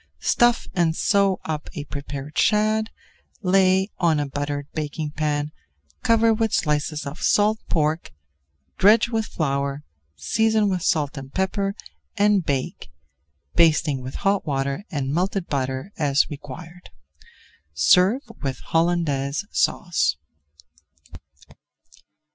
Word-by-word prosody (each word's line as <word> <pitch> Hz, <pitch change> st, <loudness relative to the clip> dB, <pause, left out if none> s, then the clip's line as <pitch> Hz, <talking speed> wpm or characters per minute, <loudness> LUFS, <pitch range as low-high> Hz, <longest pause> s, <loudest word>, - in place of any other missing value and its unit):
Stuff 240 Hz, 0 st, +2 dB
and 170 Hz, -3 st, +1 dB
sew 200 Hz, -1 st, +2 dB
up 155 Hz, -1 st, -4 dB
a 145 Hz, -, -4 dB
prepared 140 Hz, 0 st, -7 dB
shad, 215 Hz, +1 st, +2 dB, 0.5 s
lay 190 Hz, 0 st, +3 dB
on 165 Hz, -4 st, +3 dB
a 145 Hz, -, 0 dB
buttered 145 Hz, +1 st, -3 dB
baking 150 Hz, 0 st, -4 dB
pan, 150 Hz, -1 st, -1 dB, 0.5 s
cover 230 Hz, 0 st, +4 dB
with 220 Hz, -1 st, 0 dB
slices 150 Hz, 0 st, 0 dB
of 140 Hz, +4 st, -7 dB
salt 210 Hz, +1 st, +3 dB
pork, 155 Hz, -, 0 dB, 0.7 s
dredge 215 Hz, +4 st, +5 dB
with 225 Hz, -2 st, -1 dB
flour, 140 Hz, -1 st, -2 dB, 0.3 s
season 220 Hz, -, +1 dB
with 185 Hz, -2 st, -1 dB
salt 150 Hz, -4 st, 0 dB
and 135 Hz, 0 st, -10 dB
pepper 195 Hz, +1 st, -1 dB, 0.4 s
and 205 Hz, -2 st, +3 dB
bake, 140 Hz, -4 st, -3 dB, 0.6 s
basting 155 Hz, -4 st, +3 dB
with 130 Hz, +1 st, -7 dB
hot 200 Hz, 0 st, +1 dB
water 140 Hz, +4 st, -1 dB
and 140 Hz, -2 st, -2 dB
melted 185 Hz, +2 st, 0 dB
butter 130 Hz, +4 st, -3 dB
as 145 Hz, 0 st, +2 dB
required. 150 Hz, +5 st, -10 dB, 0.9 s
Serve 180 Hz, -, +4 dB, 0.2 s
with 135 Hz, -2 st, -2 dB
Hollandaise 165 Hz, -2 st, 0 dB
Sauce. 80 Hz, -, +1 dB
160 Hz, 115 wpm, -23 LUFS, 145-195 Hz, 0.9 s, dredge